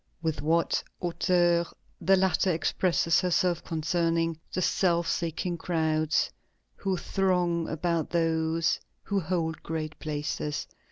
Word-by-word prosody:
With 160 -3 -2
what 165 +3 +1 0.2
hauteur 175 -1 +2 0.4
the 195 - +4
latter 190 0 +2
expresses 165 0 +2
herself 180 -1 +1
concerning 165 0 0
"the - - -2
self 170 -2 +2
seeking 170 +1 -2
crowds 155 -2 +1 0.4
who 190 -2 -2
throng 180 -3 +1
about 165 0 -1
those 165 -1 +1 0.2
who 200 -1 0
hold 165 -2 -2
great 155 -1 -4
places"! 150 -1 -3
170 Hz, 110 wpm, -28 LUFS, 160-180 Hz, 0.4 s, the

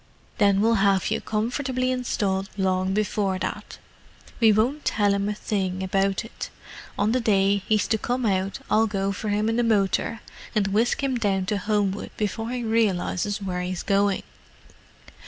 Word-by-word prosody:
"Then 200 -2 +4
we'll 225 -2 +3
have 195 -1 +2
you - - 0
comfortably 255 +4 -1
installed 200 -6 -1
long 185 -1 +1
before 200 -1 0
that. - - -5 0.6
We 225 -2 +6
won't 245 +8 +1
tell 205 -2 +2
him 200 +1 0
a 210 - -2
thing 190 -3 -2
about 195 +3 0
it: 225 - -7 0.5
on 210 +2 +2
the 255 - +2
day 200 -3 +3
he's 215 -1 +2
to 220 - +2
come 245 +2 -1
out 195 -1 0
I'll 220 +1 +3
go 195 -1 -1
for 210 +2 -4
him 210 +1 +1
in 225 +1 0
the 240 - +2
motor 220 0 +1 0.3
and 200 -2 +2
whisk 225 +7 +1
him 265 -2 +1
down 195 -4 0
to 205 +1 -1
Homewood 205 0 -1
before 225 +2 -2
he 245 -1 -3
realizes 205 -2 0
where 180 -2 -2
he's 180 0 -3
going. 200 -1 +1
205 Hz, 170 wpm, -25 LUFS, 195-225 Hz, 0.6 s, We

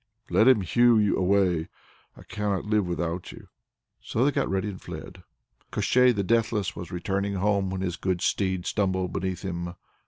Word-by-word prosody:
"Let 110 - +4
him 130 -6 +6
hew 110 +2 +4
away! 90 -3 +2 0.5
I - - -13
cannot 105 -3 -2
live 105 -3 +1
without 85 0 -3
you." - - -13 0.5
So 120 - 0
they 145 - +3
got - - -1
ready 95 +1 -1
and 95 -3 -7
fled. - - -9 0.5
Koshchei 125 0 +4
the 105 -4 -1
Deathless 110 -2 0
was 85 0 -8
returning 100 +3 -2
home 100 0 +1
when 95 0 -3
his 90 -2 -2
good 95 -1 -1
steed 95 -3 0
stumbled 95 -3 -1
beneath 95 0 -3
him. 85 -2 -4
95 Hz, 165 wpm, -26 LUFS, 90-105 Hz, 0.5 s, him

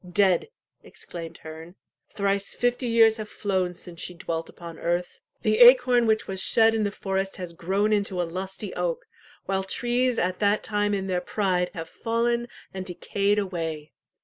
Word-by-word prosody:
"Dead!" 190 - +3 0.3
exclaimed 165 -2 -9
Herne. 160 +3 -10 0.3
"Thrice 200 0 -1
fifty 245 +1 0
years 225 -1 +5
have 215 -1 -6
flown 185 -3 -1
since 170 -1 -10
she 180 - -5
dwelt 165 -1 -4
upon 170 -2 -10
earth. 175 +1 -2 0.2
The 215 0 +2
acorn 245 -1 +7
which 220 0 +2
was 190 0 -3
shed 225 +1 +5
in 225 - 0
the 205 - 0
forest 195 -1 -2
has 180 -3 -6
grown 195 +5 0
into 200 -3 0
a - - +2
lusty 190 +3 -5
oak, 175 -2 -2 0.4
while 190 0 -1
trees 245 +4 0
at 180 +1 0
that 205 0 +2
time 205 -1 0
in 195 -1 -3
their 180 -2 -1
pride 180 -2 0
have 165 -1 -5
fallen 235 +4 -1 0.3
and 190 -1 -4
decayed 200 +3 -1
away. 165 -6 -3
195 Hz, 170 wpm, -26 LUFS, 180-215 Hz, 0.4 s, acorn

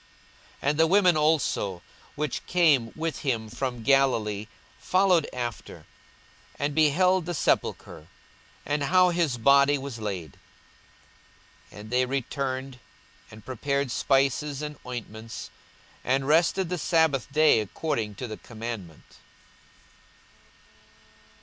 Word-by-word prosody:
42:023:055 140 - +2
And 150 - -5
the 160 - +5
women 185 -1 +4
also, 150 - 0 0.3
which 150 +1 -3
came 150 -10 +3
with 160 -2 -3
him 115 -6 -2
from 120 0 -4
Galilee, 110 -6 +2 0.3
followed 185 -4 +2
after, 120 -2 -6 0.7
and 145 +1 -1
beheld 170 +4 +3
the 175 - -2
sepulchre, 80 - -1 0.6
and 145 +1 -1
how 185 +4 +4
his 165 -7 0
body 140 +3 +4
was 135 -3 -7
laid. 95 -9 -5 1.3
42:023:056 - - -12
And 105 - -11
they 125 +1 +2
returned, 135 0 -3 0.5
and 110 +1 -14
prepared 140 +1 -2
spices 140 +2 +1
and 150 -1 -6
ointments; 115 -2 -7 0.5
and 135 +1 0
rested 170 +4 +2
the 180 -1 -2
sabbath 155 -6 +1
day 155 -4 +5
according 110 - -3
to 125 - -6
the 110 - -7
commandment. 110 -8 -8
135 Hz, 115 wpm, -26 LUFS, 115-155 Hz, 1.3 s, the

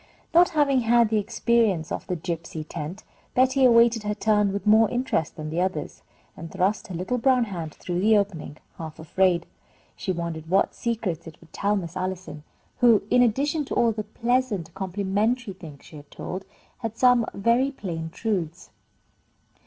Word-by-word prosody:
Not 345 +2 +6
having 280 -3 +4
had 235 -1 +3
the 215 -1 +2
experience 215 -5 +1
of - - -4
the 180 - -1
gypsy 165 -2 -5
tent, 160 +8 -6 0.3
Betty 260 +1 +3
awaited 235 -1 +5
her 210 0 -2
turn 210 -2 +2
with 200 +2 -4
more 220 +1 +5
interest 245 - -1
than 155 -1 -6
the 170 +2 0
others, 185 -5 -3 0.3
and 165 +1 -8
thrust 195 +4 0
her 185 - -6
little 215 +9 -2
brown 255 0 +3
hand 170 -8 -6
through 175 -1 -3
the 215 +3 +4
opening, 170 -7 -3 0.2
half 160 -2 -7
afraid. 175 +2 +1 0.5
She 190 - -3
wondered 165 -2 -5
what 195 +2 +2
secrets 210 -9 -3
it 160 - -12
would 165 - -20
tell 205 +1 0
Miss 175 -3 -4
Allison, 185 -5 -4 0.4
who, 235 -4 +5
in 250 - +5
addition 280 +6 +1
to - - -4
all 235 -1 +3
the 215 0 -3
pleasant, 235 -9 -1
complimentary 200 +4 -1
things 155 -6 -12
she 155 - -12
had 145 0 -14
told, 185 +2 -6 0.3
had 225 -3 -4
added - - -31
some 245 -2 +4
very 235 +6 +2
plain 170 -11 -5
truths. 180 -3 -3
200 Hz, 175 wpm, -25 LUFS, 170-235 Hz, 0.5 s, Not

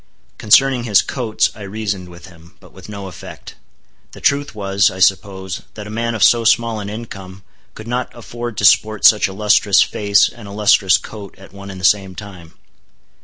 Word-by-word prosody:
Concerning 125 +3 +3
his 105 -4 +3
coats, 120 -5 -1
I 105 - -13
reasoned 100 -2 -5
with 85 +1 -14
him; 85 0 -18
but - - -19
with 95 +2 -14
no 100 -2 -8
effect. 90 -4 -11 0.6
The - - -12
truth 140 -4 0
was, 100 -1 +1
I 95 - -10
suppose, 95 0 -1
that 105 - -8
a 105 - -9
man 115 +1 -3
of 110 - 0
so 120 -1 +4
small 115 0 +1
an 100 -1 -6
income, 95 -4 -9 0.3
could 110 - -11
not 125 +2 -3
afford 120 -1 -8
to 100 - 0
sport 110 +4 +3
such 105 - +6
a 95 - -9
lustrous 105 0 +3
face 100 0 +2
and 115 -3 -12
a - - -10
lustrous 100 -2 +3
coat 105 -3 -11
at 95 0 -16
one 100 0 -11
and 95 -1 -9
the 90 - -3
same 95 -1 +1
time. 90 -6 -12
100 Hz, 195 wpm, -17 LUFS, 95-110 Hz, 0.6 s, such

